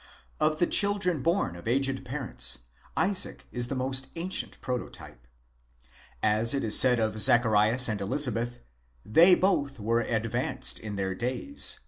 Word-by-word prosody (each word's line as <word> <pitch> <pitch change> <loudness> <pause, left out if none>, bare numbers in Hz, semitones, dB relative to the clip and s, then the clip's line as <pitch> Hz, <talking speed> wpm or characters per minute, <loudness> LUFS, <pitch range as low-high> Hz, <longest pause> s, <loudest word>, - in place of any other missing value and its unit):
Of 155 0 +1
the 175 - +2
children 200 -6 0
born 165 - -1
of 85 +4 -11
aged 135 +2 0
parents, 65 - -2 0.3
Isaac 185 +4 0
is 120 -1 -2
the 135 - -4
most 130 +1 -3
ancient 175 +3 -4
pro 125 -1 -3
totype. - - -12 1.0
As 110 +4 +2
it 135 - -2
is 110 - +3
said 125 -2 +4
of 110 -1 -1
Zacharias 110 +2 +5
and 105 -3 -3
Elizabeth, 120 +1 -2 0.4
"they 170 - +6
both 140 -9 0
were 115 +3 0
advanced 120 +3 -2
in 105 -2 -7
their 95 -1 -3
days" 130 - -2
(v. - - -17
125 Hz, 150 wpm, -27 LUFS, 110-145 Hz, 1.0 s, they